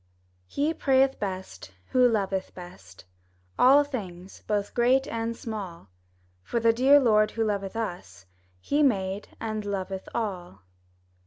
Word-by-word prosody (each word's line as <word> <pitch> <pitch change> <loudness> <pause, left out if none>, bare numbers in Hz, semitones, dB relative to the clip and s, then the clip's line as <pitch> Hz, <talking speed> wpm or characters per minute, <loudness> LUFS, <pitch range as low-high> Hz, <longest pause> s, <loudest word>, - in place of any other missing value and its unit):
HE 295 +3 -1
prayeth 270 -2 +2
best, 185 - -6 0.2
who 250 -1 +5
loveth 195 -4 -2
best 100 - -13 0.5
All 275 +3 +7
things, 195 -10 -8
both 205 -1 -1
great 255 +3 +3
and 230 0 -3
small; 190 - -7 0.5
For 235 - -2
the 230 0 +3
dear 270 +5 +6
Lord 215 -5 +3
who 225 - +2
loveth 200 -1 -2
us, 175 - -6 0.3
He 290 - 0
made 200 -7 0
and 215 -1 -4
loveth 195 -1 -4
all. 180 - -4
210 Hz, 130 wpm, -26 LUFS, 190-240 Hz, 0.5 s, All